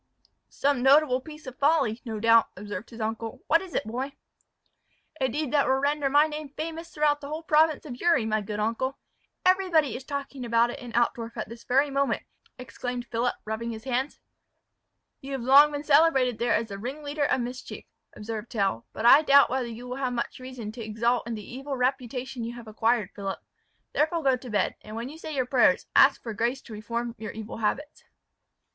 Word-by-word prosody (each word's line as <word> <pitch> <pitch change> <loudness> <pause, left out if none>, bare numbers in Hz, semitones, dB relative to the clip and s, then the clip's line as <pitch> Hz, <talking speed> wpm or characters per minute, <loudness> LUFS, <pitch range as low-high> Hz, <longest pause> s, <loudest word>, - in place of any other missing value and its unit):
"Some 280 -2 0
notable 270 -1 +5
piece 305 +2 -12
of 260 -1 -9
folly, 280 -6 +2
no 220 -4 -5
doubt," 230 +1 +5
observed 205 +1 -6
his 235 - -11
uncle; 225 +1 -4
"what 330 +2 +4
is 375 -3 -9
it, - - +1
boy?" 255 +5 -4 1.1
"A 260 - +2
deed 295 +3 -3
that 285 -2 +3
will 265 - +3
render 285 +1 +1
my 290 +2 +5
name 305 -1 -6
famous 325 +3 -6
throughout 295 -2 +1
the 280 - -7
whole 310 +3 -5
province 315 -1 +3
of 250 -5 -7
Uri, 335 -10 +3
my 215 -1 0
good 210 +1 -5
uncle. 230 +5 -1 0.5
Everybody 365 - +3
is 260 - -6
talking 280 -1 -5
about 235 0 +2
it - - -8
in 245 -2 -9
Altdorf 235 -1 0
at 215 - -4
this 230 0 -10
very 275 +3 +2
moment," 275 0 0 0.3
exclaimed 245 0 -5
Philip, 235 0 -1
rubbing 220 +2 -3
his 220 -1 -6
hands. 260 +2 -2 1.0
"You 275 +1 -7
have 265 -3 -3
long 280 +4 +7
been 290 0 -4
celebrated 280 -6 +4
there 240 0 +2
as 225 0 -1
the 200 0 -6
ringleader 285 +5 -3
of 260 - +1
mischief," 245 +2 -7 0.3
observed 220 +1 -6
Tell; 195 - -1
"but 220 - -4
I 270 +5 +9
doubt 280 -3 +6
whether 260 -2 -1
you 235 +2 -8
will 250 +1 -5
have 260 -2 -1
much 235 +1 -3
reason 255 -4 -7
to 230 +1 -8
exult 230 +2 0
in 235 - -3
the 210 -2 -9
evil 270 +2 -5
reputation 250 -1 -2
you 235 +1 -5
have 235 -2 -10
acquired, 220 -1 0
Philip. 195 -1 -4 0.6
Therefore 320 +2 +1
go 265 -2 +4
to 250 0 -10
bed, 205 -3 0
and 215 0 -9
when 235 +3 -4
you 310 +3 -11
say 315 -2 -6
your 260 -2 +1
prayers, 250 0 +3
ask - - +6
for 230 - -4
grace 240 +5 -1
to 225 - -11
reform 235 +2 -4
your 220 -1 -6
evil 220 0 -7
habits." 265 +7 -2
250 Hz, 200 wpm, -27 LUFS, 230-285 Hz, 1.1 s, I